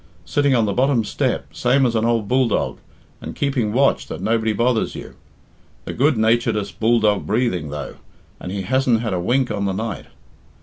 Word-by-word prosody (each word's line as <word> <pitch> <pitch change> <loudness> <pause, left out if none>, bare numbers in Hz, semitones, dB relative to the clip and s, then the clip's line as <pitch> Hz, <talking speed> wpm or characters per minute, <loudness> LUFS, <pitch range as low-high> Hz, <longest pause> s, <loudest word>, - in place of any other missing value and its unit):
Sitting 145 -2 +2
on 115 -2 +3
the 100 - -1
bottom 130 0 +2
step - - -2
same 135 +2 +2
as 120 - +1
an 110 0 +1
ould 115 -3 0
bulldog, 130 0 0 0.4
and - - -7
keeping 135 -7 -1
watch 135 +5 +2
that - - -6
nobody 110 0 0
bothers 115 +2 0
you. - - -9 0.7
The - - -5
good 140 +3 +2
naturedst 110 -1 0
bulldog 110 -3 +2
breathing, 105 - 0
though, 75 -2 -6 0.4
and 90 - -6
he 100 0 -3
hasn't 125 +1 +1
had 110 -4 -2
a 90 - -1
wink 125 +7 +1
on 100 - -2
the 95 - -1
night. 110 +2 -4
115 Hz, 180 wpm, -20 LUFS, 105-125 Hz, 0.7 s, on